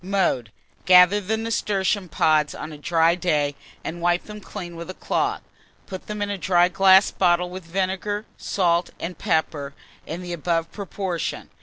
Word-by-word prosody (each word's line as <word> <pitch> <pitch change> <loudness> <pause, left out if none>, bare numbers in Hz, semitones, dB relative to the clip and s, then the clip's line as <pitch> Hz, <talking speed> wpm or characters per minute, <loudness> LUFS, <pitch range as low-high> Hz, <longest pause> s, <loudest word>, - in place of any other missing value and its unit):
Mode. 180 - 0 0.3
Gather 185 +2 +7
the 215 +3 -1
nasturtium 205 -4 -1
pods 155 -2 +2
on 155 - -7
a - - -9
dry 165 +2 +3
day, 150 -5 0 0.3
and 170 +1 -5
wipe 175 +1 +2
them 210 0 -10
clean 175 -4 -8
with 170 +2 -8
a 185 - -6
cloth; - - -1 0.4
put 185 -2 -8
them 210 -1 -3
in 205 - -3
a 200 - -4
dry 175 0 +3
glass 190 +1 +5
bottle, 180 -1 +2
with 185 -1 -8
vinegar, 195 +4 -2
salt, 175 -2 0
and 175 +2 -5
pepper 155 -6 -1 0.3
in 170 +3 -5
the 175 -1 -5
above 165 0 -1
proportion. 190 -4 -4
180 Hz, 165 wpm, -23 LUFS, 170-195 Hz, 0.4 s, Gather